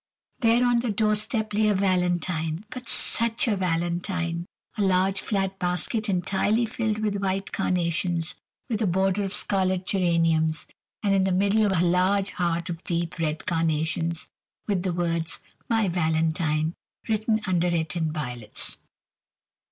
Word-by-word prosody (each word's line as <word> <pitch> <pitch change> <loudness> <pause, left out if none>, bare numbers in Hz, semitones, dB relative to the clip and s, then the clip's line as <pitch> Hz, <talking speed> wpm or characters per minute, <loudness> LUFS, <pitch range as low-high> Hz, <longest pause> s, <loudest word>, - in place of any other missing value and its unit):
There 235 0 +4
on 245 -1 +3
the 240 0 -1
doorstep 215 +1 +1
lay 215 +1 +3
a 210 - +3
valentine, 180 -2 0
but 250 -1 -7
such 230 +5 +3
a 215 - +2
valentine! 175 -1 -1 0.3
A 215 - -2
large 190 0 +2
flat 195 -2 -1
basket 180 +5 -1
entirely 200 +5 +1
filled 220 -1 -2
with 200 -2 -1
white 195 0 -1
carnations, 170 -1 -1 0.3
with 230 -4 -2
a 215 - +2
border 190 +2 +1
of 195 -1 -2
scarlet 185 -2 +1
geraniums, 165 -4 +2 0.4
and 200 -1 +2
in 195 -1 +3
the 190 - +1
middle 200 +3 +3
a 180 +2 +3
huge 200 0 -1
heart 170 -1 -1
of 170 -1 -5
deep 170 0 -2
red 155 -1 -2
carnations, 165 0 -1 0.4
with 200 -4 0
the 185 0 -1
words 170 -2 -1 0.3
"My 225 -3 +2
Valentine" 160 -2 0 0.3
written 220 0 +1
under 180 -2 +1
it 165 -1 -1
in 160 -2 0
violets. 125 -8 -5
185 Hz, 145 wpm, -25 LUFS, 170-205 Hz, 0.4 s, There